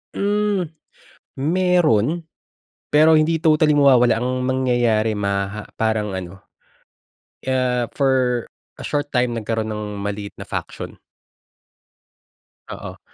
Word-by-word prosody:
Hmm. 205 -4 0 0.7
Meron, 165 - +2 0.7
pero 155 +2 +6
hindi 155 +1 +3
totally 155 -1 +3
mawawala. 130 -5 +5
Ang 125 +2 -1
mangyayari 120 -4 +1
maha 100 0 -2
parang 110 -2 0
ano, 95 +1 -7 1.0
ah, 125 -2 +1
for 130 -3 +1 0.3
a - - -8
short 145 0 -1
time 125 -1 +2
nagkaroon 110 -1 -2
ng 105 -1 -5
maliit 100 0 -5
na - - -8
faction. - - -6 1.7
Oo. - - -8
125 Hz, 100 wpm, -21 LUFS, 110-150 Hz, 1.7 s, pero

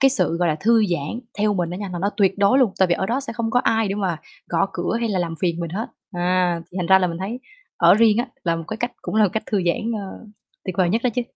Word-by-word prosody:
cái 270 - +6
sự, 255 -10 +2
gọi 175 0 +1
là, 155 - 0
thư 225 +1 +4
giãn 175 +5 -3 0.2
theo 210 0 +2
mình 175 -3 -1
á 180 - -4
nha, 200 0 -5
là 175 - -4
nó 200 +4 0
tuyệt 195 -1 +2
đối 200 +6 +4
luôn, 245 -7 +3
tại 190 - +4
vì 175 - +3
ở 190 - -2
đó 245 +6 0
sẽ 275 - -5
không 230 -1 -2
có 245 - +3
ai 225 -3 +1
để 195 - -1
mà 190 -5 -1 0.3
gõ 170 +2 +1
cửa 175 +6 -2
hay 230 - 0
là 200 -3 0
làm 170 -2 -2
phiền 170 -2 0
mình 170 -2 -4
hết. 210 +7 -3 0.3
À, 175 -1 +1
thì 180 - -10
thành 175 - -1
ra 190 +2 +6
là 185 - +1
mình 170 -1 -4
thấy 210 +7 -4 0.4
ở - - +6
riêng 220 0 +4
á 240 - 0 0.2
là 170 -1 +1
một 165 - -6
cái 220 - -4
cách 240 +2 -3
cũng - - -5
là 215 -2 +4
cách 220 +4 -3
thư 205 -3 0
giãn, 220 +7 0
ơ, 205 +1 -7 0.4
tuyệt 185 -3 -4
vời 185 -2 +3
nhất 225 +4 0
đó 250 - +3
chứ. 245 - +2
195 Hz, 305 wpm, -22 LUFS, 175-225 Hz, 0.4 s, cái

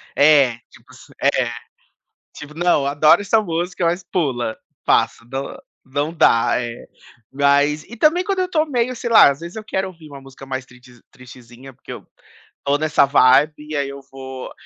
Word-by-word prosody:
É 140 -5 +4
tipo - - -19
se - - -17
É. - - +1 0.8
Tipo: 150 0 -10
"Não, 170 -4 +1
adoro 145 +6 +4
essa 220 +2 +2
música, 175 -1 -3
mas 175 +2 -1
pula, 130 -11 -2 0.3
passa". 115 - +1
Não, 135 +1 -5 0.3
não 145 +4 -3
dá, 115 -7 +3
é. 120 -1 -7 0.5
Mas 145 +2 +2
e 235 - -10
também 320 +7 +3
quando 390 0 -2
eu 365 0 -1
tô 315 -3 +1
meio, 255 -4 -1
sei 235 - -5
lá, 225 -10 +7
às 140 - -7
vezes 170 +4 -9
eu 220 - -6
quero 190 -2 -3
ouvir 165 -4 -15
uma 140 -1 -11
música 135 0 -13
mais 130 -1 -5
triste, 125 -1 -19
tristezinha, 125 +1 -14
porque - - -13
eu - - -11 0.6
tô 140 +1 +2
nessa 150 -2 +2
vibe 140 +2 +4
e 150 +1 -8
aí 140 -1 -2
eu 140 0 -9
vou, 130 -1 -9
145 Hz, 180 wpm, -19 LUFS, 135-175 Hz, 0.8 s, lá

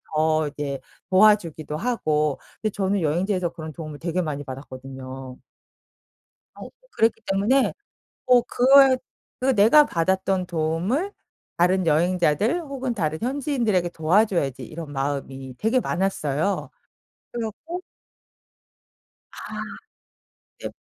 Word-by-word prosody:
더 155 0 +2
이제 140 -2 -4 0.3
도와주기도 185 -7 +3
하고 155 - 0 0.2
근데 215 -2 0
저는 195 0 0
여행지에서 175 +3 0
그런 160 -2 -8
도움을 155 -3 -8
되게 175 +2 -1
많이 145 -2 -4
받았거든요. 130 -1 -9 1.2
어 - - -9 0.2
그랬기 225 - +1
때문에 215 +8 +2 0.5
어 250 -1 +6
그에 265 +2 +5 0.4
그게 265 +1 +2
내가 235 +8 +6
받았던 190 +2 0
도움을 175 - -1 0.4
다른 180 +1 +3
여행자들 175 - +2
혹은 265 -5 -4
다른 155 -6 -2
현지인들에게 245 - 0
도와줘야지 170 - +1
이런 155 -2 -8
마음이 135 -2 -4
되게 230 +4 +2
많았어요. 185 - -1 0.6
그래 235 -1 -3
갖고 330 - -6 1.5
아. - - -15 1.2
벺 - - -5
180 Hz, 260 characters per minute, -24 LUFS, 155-225 Hz, 1.5 s, 어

